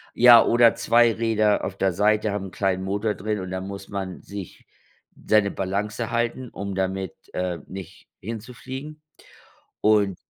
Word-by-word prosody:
Ja, 120 Hz, -1 st, +8 dB
oder 115 Hz, -1 st, +5 dB
2 115 Hz, 0 st, +4 dB
Räder 110 Hz, -2 st, +1 dB
auf 95 Hz, -, -4 dB
der 95 Hz, -2 st, +1 dB
Seite, 105 Hz, +2 st, +2 dB
haben 100 Hz, -1 st, -3 dB
'n -, -, -12 dB
kleinen 95 Hz, -1 st, -1 dB
Motor 105 Hz, +2 st, -1 dB
drin 105 Hz, +1 st, -3 dB
und 95 Hz, -1 st, -6 dB
da 95 Hz, 0 st, -3 dB
muss 100 Hz, 0 st, -7 dB
man 95 Hz, -2 st, -5 dB
sich 100 Hz, -3 st, -9 dB, 0.6 s
seine 105 Hz, -2 st, +3 dB
Balance 105 Hz, +5 st, -3 dB
halten, 120 Hz, +2 st, -1 dB
um 100 Hz, -2 st, -5 dB
damit, 95 Hz, -1 st, -2 dB, 0.2 s
äh, 90 Hz, -2 st, -2 dB
nicht 95 Hz, -1 st, -10 dB
hinzufliegen. 130 Hz, +7 st, -8 dB, 0.8 s
Und 105 Hz, -3 st, +3 dB
105 Hz, 150 wpm, -24 LUFS, 95-115 Hz, 0.8 s, Ja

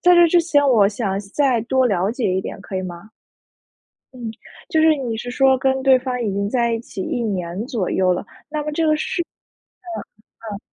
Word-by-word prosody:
在 355 Hz, 0 st, +6 dB
这 345 Hz, -1 st, +7 dB
之 350 Hz, +1 st, +5 dB
前 310 Hz, -4 st, +2 dB
我 220 Hz, -7 st, +5 dB
想 200 Hz, -2 st, -2 dB, 0.2 s
再 265 Hz, -5 st, +3 dB
多 260 Hz, +2 st, +2 dB
了 195 Hz, -4 st, +1 dB
解 230 Hz, -5 st, -1 dB
一 190 Hz, -, +1 dB
点， -, -, -6 dB
可 195 Hz, -1 st, -6 dB
以 185 Hz, -, -2 dB
吗？ 180 Hz, +3 st, -8 dB, 1.0 s
嗯， 240 Hz, -3 st, -5 dB, 0.4 s
就 315 Hz, -, +2 dB
是 315 Hz, 0 st, +6 dB
你 250 Hz, -6 st, -3 dB
是 245 Hz, +2 st, -6 dB
说 265 Hz, +1 st, +4 dB
跟 265 Hz, 0 st, +1 dB
对 260 Hz, -1 st, +6 dB
方 250 Hz, -1 st, -3 dB
已 210 Hz, -4 st, -1 dB
经 200 Hz, +1 st, -1 dB
在 235 Hz, +1 st, +1 dB
一 230 Hz, -, 0 dB
起 210 Hz, -, -8 dB
1 245 Hz, -, -2 dB
年 190 Hz, -2 st, -3 dB
左 225 Hz, -8 st, -2 dB
右 185 Hz, -1 st, +2 dB
了， 180 Hz, -, -4 dB, 0.2 s
那 300 Hz, 0 st, -3 dB
么 300 Hz, -, -3 dB
这 320 Hz, +2 st, 0 dB
个 310 Hz, 0 st, +3 dB
是 315 Hz, -, -2 dB
嗯 -, -, -15 dB, 1.3 s
嗯。 200 Hz, -, -5 dB
245 Hz, 225 characters per minute, -21 LUFS, 200-275 Hz, 1.3 s, 这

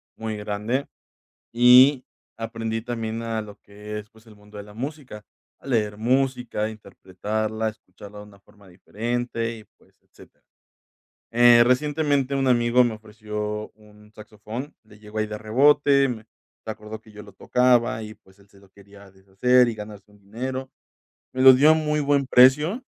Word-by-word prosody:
muy 110 Hz, -1 st, -5 dB
grande, 105 Hz, +6 st, -3 dB, 0.7 s
y 125 Hz, +3 st, +6 dB, 0.3 s
aprendí 115 Hz, 0 st, -5 dB
también 115 Hz, -1 st, -5 dB
a 115 Hz, -1 st, -3 dB
lo 105 Hz, -1 st, -12 dB
que 105 Hz, +1 st, -9 dB
es, 105 Hz, +1 st, -11 dB
pues, 110 Hz, +1 st, -22 dB
el 110 Hz, -2 st, -17 dB
mundo 105 Hz, 0 st, -15 dB
de 100 Hz, -, -8 dB
la 105 Hz, -, -15 dB
música, 130 Hz, -3 st, -8 dB, 0.3 s
a -, -, -19 dB
leer 105 Hz, -5 st, -1 dB
música, 125 Hz, -2 st, -1 dB
interpretarla, 110 Hz, +2 st, -5 dB
escucharla 105 Hz, -1 st, -15 dB
de 105 Hz, -, -10 dB
una 100 Hz, -1 st, -19 dB
forma 100 Hz, -1 st, -22 dB
diferente 115 Hz, +5 st, -4 dB
y, 110 Hz, -, -15 dB
pues, -, -, -29 dB
etcétera. -, -, -21 dB, 0.9 s
Eh, 120 Hz, 0 st, +6 dB
recientemente 140 Hz, +1 st, 0 dB
un 135 Hz, -1 st, 0 dB
amigo 120 Hz, 0 st, +3 dB
me 120 Hz, -2 st, -2 dB
ofreció 105 Hz, 0 st, -6 dB
un 105 Hz, 0 st, -20 dB
saxofón, 110 Hz, +6 st, -9 dB
le 105 Hz, -1 st, -19 dB
llegó 105 Hz, 0 st, -7 dB
ahí 110 Hz, -, -1 dB
de 105 Hz, 0 st, -6 dB
rebote, 140 Hz, +5 st, +3 dB
me 115 Hz, -3 st, -6 dB, 0.4 s
se -, -, -7 dB
acordó 110 Hz, 0 st, -9 dB
que 110 Hz, -, -19 dB
yo 105 Hz, -, -11 dB
lo -, -, -15 dB
tocaba 120 Hz, -3 st, +1 dB
y 110 Hz, 0 st, -9 dB
pues, 95 Hz, +1 st, -25 dB
él 100 Hz, 0 st, -24 dB
se 100 Hz, -, -21 dB
lo 100 Hz, -1 st, -22 dB
quería 100 Hz, 0 st, -17 dB
deshacer 100 Hz, +7 st, +2 dB
y 115 Hz, -, -5 dB
ganarse 105 Hz, -1 st, -11 dB
un 105 Hz, -, -22 dB
dinero. 130 Hz, +6 st, -6 dB, 0.6 s
Me 130 Hz, -, -2 dB
lo 130 Hz, 0 st, +9 dB
dio 145 Hz, +5 st, +5 dB
a -, -, +6 dB
muy 150 Hz, -1 st, -1 dB
buen 140 Hz, -1 st, +1 dB
precio 150 Hz, -, +4 dB
110 Hz, 170 wpm, -23 LUFS, 105-125 Hz, 0.9 s, lo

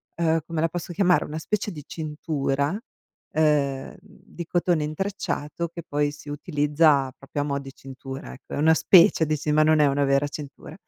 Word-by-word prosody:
uhm, 165 Hz, -1 st, +2 dB
come 165 Hz, -2 st, -2 dB
la 165 Hz, -, +2 dB
posso 175 Hz, +1 st, -5 dB
chiamare, 180 Hz, 0 st, +3 dB
una 155 Hz, -, -6 dB
specie 205 Hz, +5 st, -2 dB
di 150 Hz, -5 st, -9 dB
cintura, 150 Hz, +1 st, -2 dB, 0.5 s
ehm, 145 Hz, -3 st, +1 dB
di 170 Hz, -, -11 dB
cotone 175 Hz, -3 st, +1 dB
intrecciato, 170 Hz, -1 st, -3 dB
che 170 Hz, 0 st, -9 dB
poi 145 Hz, -1 st, 0 dB
si 150 Hz, 0 st, -12 dB
utilizza 145 Hz, -2 st, +2 dB
proprio 135 Hz, +1 st, -5 dB
a 145 Hz, -, -1 dB
mo' 140 Hz, -1 st, -1 dB
di 135 Hz, -1 st, -10 dB
cintura 135 Hz, 0 st, -9 dB
ecco, 135 Hz, -, -12 dB
è -, -, -2 dB
una 160 Hz, +2 st, +5 dB
specie, 170 Hz, -1 st, +5 dB
di 155 Hz, 0 st, 0 dB
ci 150 Hz, +1 st, -2 dB
ma 155 Hz, +1 st, +4 dB
non 155 Hz, 0 st, +4 dB
è 145 Hz, -, +5 dB
una 140 Hz, +1 st, +1 dB
vera 140 Hz, +1 st, +2 dB
cintura. 145 Hz, 0 st, -9 dB
150 Hz, 190 wpm, -24 LUFS, 145-165 Hz, 0.5 s, una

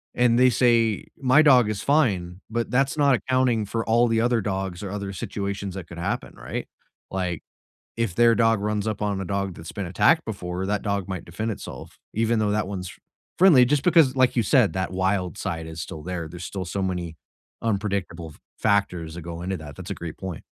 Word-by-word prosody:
and 120 Hz, -1 st, +3 dB
they 130 Hz, 0 st, +6 dB
say, 115 Hz, -3 st, +2 dB
"My 130 Hz, +3 st, +5 dB
dog 130 Hz, -7 st, +6 dB
is 105 Hz, -2 st, -3 dB
fine," 100 Hz, -, +1 dB
but 115 Hz, 0 st, -2 dB
that's 135 Hz, +4 st, +1 dB
not 140 Hz, -3 st, +4 dB
accounting 125 Hz, -3 st, +1 dB
for 115 Hz, +2 st, -2 dB
all 120 Hz, +2 st, +3 dB
the 115 Hz, -1 st, +2 dB
other 120 Hz, -1 st, +2 dB
dogs, 95 Hz, -2 st, -3 dB
or 95 Hz, -, -5 dB
other 100 Hz, -1 st, -4 dB
situations 100 Hz, 0 st, -4 dB
that 95 Hz, -4 st, -7 dB
could 85 Hz, -, -10 dB
happen, 85 Hz, -, -3 dB
right? -, -, -5 dB, 0.4 s
Like, 90 Hz, -4 st, -2 dB, 0.5 s
if 115 Hz, -5 st, -1 dB
their 120 Hz, -1 st, +5 dB
dog 115 Hz, -2 st, +3 dB
runs 105 Hz, 0 st, -1 dB
up 105 Hz, -1 st, -3 dB
on 100 Hz, -2 st, -1 dB
a -, -, -4 dB
dog 100 Hz, -1 st, -2 dB
that's 80 Hz, -, -9 dB
been 100 Hz, -, -4 dB
attacked 160 Hz, -, +3 dB
before, 95 Hz, -3 st, -4 dB
that 105 Hz, +1 st, -1 dB
dog 100 Hz, -2 st, -2 dB
might 95 Hz, -2 st, -5 dB
defend 110 Hz, +7 st, -4 dB
itself, -, -, -9 dB, 0.2 s
even 115 Hz, +1 st, +1 dB
though 105 Hz, -1 st, +1 dB
that 105 Hz, -2 st, 0 dB
one's 90 Hz, -3 st, -5 dB, 0.5 s
friendly 160 Hz, -10 st, +7 dB
just 145 Hz, +2 st, +2 dB
because, 160 Hz, -7 st, +5 dB
like 130 Hz, -1 st, +3 dB
you 120 Hz, -, +2 dB
said, 120 Hz, -1 st, +3 dB
that 95 Hz, -2 st, -2 dB
wild 95 Hz, -1 st, 0 dB
side 80 Hz, -1 st, -4 dB
is 80 Hz, 0 st, -6 dB
still 80 Hz, -1 st, -7 dB
there, 85 Hz, -2 st, -4 dB
there's 90 Hz, +2 st, -9 dB
still 95 Hz, -3 st, -5 dB
so 95 Hz, +3 st, -3 dB
many 90 Hz, -3 st, -3 dB, 0.5 s
unpredictable 100 Hz, -6 st, -2 dB
f -, -, -21 dB, 0.2 s
factors 90 Hz, -6 st, 0 dB
that 85 Hz, -, -6 dB
go 85 Hz, 0 st, -6 dB
into 95 Hz, +2 st, -3 dB
that, 75 Hz, -3 st, -10 dB
that's -, -, -9 dB
a -, -, 0 dB
great 85 Hz, -2 st, -7 dB
point. 95 Hz, -4 st, -6 dB
100 Hz, 210 wpm, -24 LUFS, 90-115 Hz, 0.5 s, friendly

